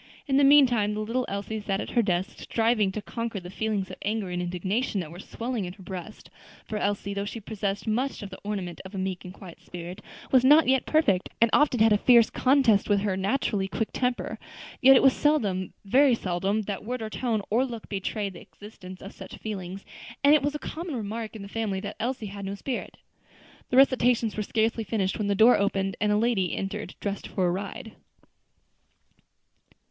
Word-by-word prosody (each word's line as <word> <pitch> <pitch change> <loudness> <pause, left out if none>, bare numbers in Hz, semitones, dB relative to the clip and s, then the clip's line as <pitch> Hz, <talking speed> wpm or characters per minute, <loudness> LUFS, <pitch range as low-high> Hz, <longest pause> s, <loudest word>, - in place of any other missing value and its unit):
In 270 -2 +2
the 285 - +5
meantime 245 -7 +5
the - - -3
little 240 +4 -1
Elsie 200 +2 -4
sat 195 -1 -1
at - - -5
her 240 - +3
desk, 185 -3 -1
striving 225 -3 +1
to 210 +2 -5
conquer 230 -1 -4
the 180 0 -10
feelings 205 -3 -2
of 185 - -8
anger 210 -3 -2
and 180 0 -2
indignation 185 +6 -1
that 160 -4 -5
were 175 - -10
swelling 230 0 -4
in 180 - -6
her 195 -1 -15
breast; 185 +3 -8 0.3
for 215 - -4
Elsie, 200 0 -1
though 200 0 -2
she 210 +3 -5
possessed 205 -2 -3
much 240 +3 -1
of 200 - -8
"the 190 - -9
ornament 195 -4 -4
of 190 +2 -10
a - - -4
meek 185 -1 -3
and 180 - -8
quiet 185 -2 -12
spirit," 180 +3 -8 0.3
was 255 -2 +5
not 295 +3 +6
yet 265 -1 +2
perfect, 205 - +2
and 230 -1 +4
often 290 -5 +4
had 220 0 +6
a 205 - +3
fierce 235 -1 +5
contest 255 -7 +3
with 200 -1 +3
her 200 -2 0
naturally 195 0 0
quick 220 +3 -2
temper. 250 -1 -2 0.4
Yet 270 +1 +8
it - - +5
was 270 -1 +6
seldom, 205 - +1
very 260 +5 +5
seldom 195 +2 -1
that 200 0 -5
word 245 +1 -4
or 220 - -4
tone 225 -4 -1
or 235 +4 +3
look 235 -4 -6
betrayed 200 0 -3
the 175 - -11
existence 185 -3 -12
of 195 - -9
such - - -10
feelings; 195 -3 -6 0.4
and 285 +1 +7
it 305 - +5
was 290 +1 -1
a - - 0
common 325 0 -5
remark 220 0 -5
in 210 - -7
the - - -8
family 205 -2 -2
that 205 0 -6
Elsie 245 -1 -2
had 200 0 -7
no 195 +1 -4
spirit. 250 +5 -5 0.7
The 250 - +1
recitations 245 -4 +4
were 215 - -2
scarcely 225 +2 0
finished 205 -1 -1
when 210 - -1
the 200 - +1
door 225 +5 +6
opened 195 -1 0
and 210 0 +2
a 210 - +3
lady 215 -5 +1
entered 195 +2 -4
dressed 200 -1 -3
for 185 - -1
a 175 - +2
ride. 205 +5 -5
210 Hz, 210 wpm, -27 LUFS, 195-240 Hz, 0.7 s, Yet